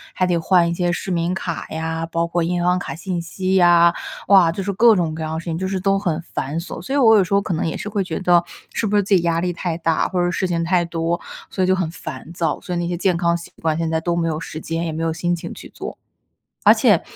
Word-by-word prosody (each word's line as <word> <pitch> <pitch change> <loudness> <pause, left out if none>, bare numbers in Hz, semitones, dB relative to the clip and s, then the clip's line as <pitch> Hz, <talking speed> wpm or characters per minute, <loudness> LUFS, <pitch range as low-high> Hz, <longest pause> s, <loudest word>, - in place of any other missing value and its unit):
还 185 - +2
得 175 -2 +1
换 170 +1 +3
一 170 - -1
些 175 0 0
市 185 +2 -3
民 170 +1 0
卡 170 -3 -4
呀， 160 +1 -3
包 170 0 +1
括 170 +1 -1
银 175 +1 0
行 180 +1 +3
卡 - - -5
信 175 +1 -3
息 185 +3 -2
呀。 175 -1 +6 0.3
哇， 185 -4 +6
就 195 - -4
是 200 - -1
各 225 +2 +6
种 165 -4 0
各 160 - -4
样 155 0 -3
的 160 - -2
事 170 - -10
情， 165 -1 -2
就 190 +1 -2
是 190 -1 -2
都 195 +1 +2
很 170 -5 -1
繁 145 +5 -3
琐， 170 - -7
所 270 - -3
以 - - +3
我 225 -5 +6
有 195 - +5
时 185 - -4
候 200 - +4
可 185 - -3
能 160 - -1
也 - - -3
是 210 - -5
会 205 -2 -1
觉 170 -3 -4
得， 175 -2 +4 0.3
是 225 - -1
不 210 - 0
是 205 - +4
自 195 0 +3
己 175 - +3
压 165 -1 +1
力 180 0 0
太 170 -1 -3
大， 165 -1 +1
或 180 -1 0
者 175 - +1
事 185 - -1
情 170 -1 -1
太 175 0 +2
多， 165 +1 -1 0.3
所 185 - -1
以 - - +2
就 185 - +4
很 180 -4 -1
烦 155 -1 -8
躁， 170 -2 -1
所 180 - -5
以 - - -1
那 170 - -1
些 175 - -2
健 180 0 +1
康 170 -1 +2
习 170 - -8
惯 160 -1 0
现 165 -1 -1
在 160 0 +1
都 170 +1 -1
没 165 -1 0
有 155 -1 -2
时 155 - -7
间， 165 +1 -3
也 160 - -2
没 160 +1 -3
有 165 - +1
心 175 +2 -1
情 165 - -7
去 - - -11
做。 - - -8 0.7
而 - - +9
且， - - +4
175 Hz, 320 characters per minute, -21 LUFS, 165-185 Hz, 0.7 s, 而